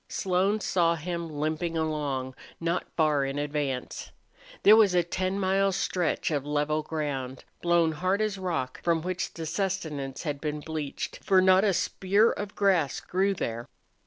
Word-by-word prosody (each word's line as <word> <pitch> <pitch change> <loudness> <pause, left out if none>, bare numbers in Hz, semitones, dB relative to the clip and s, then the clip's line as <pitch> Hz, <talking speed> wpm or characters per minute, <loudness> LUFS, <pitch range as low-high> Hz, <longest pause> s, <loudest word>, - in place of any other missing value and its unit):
Slone 190 +3 +1
saw 170 -3 +2
him, 170 +1 -4
limping 155 +3 -2
along, 145 -5 -2 0.3
not 170 +2 -1
far 150 -3 +3
in 135 +1 -3
advance. 145 -3 -3 0.5
There 210 - +9
was 210 -5 +5
a 175 - +4
ten 185 +3 -2
mile 195 +1 +2
stretch 180 -3 -1
of 145 -3 0
level 150 +1 0
ground, 140 -5 -4 0.2
blown 170 -2 +3
hard 185 +6 0
as 215 -2 -1
rock, 165 -9 -3
from 165 -2 +1
which 185 0 -3
the 165 - -5
sustenance 160 -8 -3
had 145 -3 -3
been 150 -1 -3
bleached, 155 -2 -5
for 190 -1 +4
not 185 +1 +5
a 205 - +4
spear 200 +4 +2
of 205 -1 -6
grass 185 -8 +2
grew 195 +2 0
there. 115 -7 -4
165 Hz, 160 wpm, -27 LUFS, 150-190 Hz, 0.5 s, There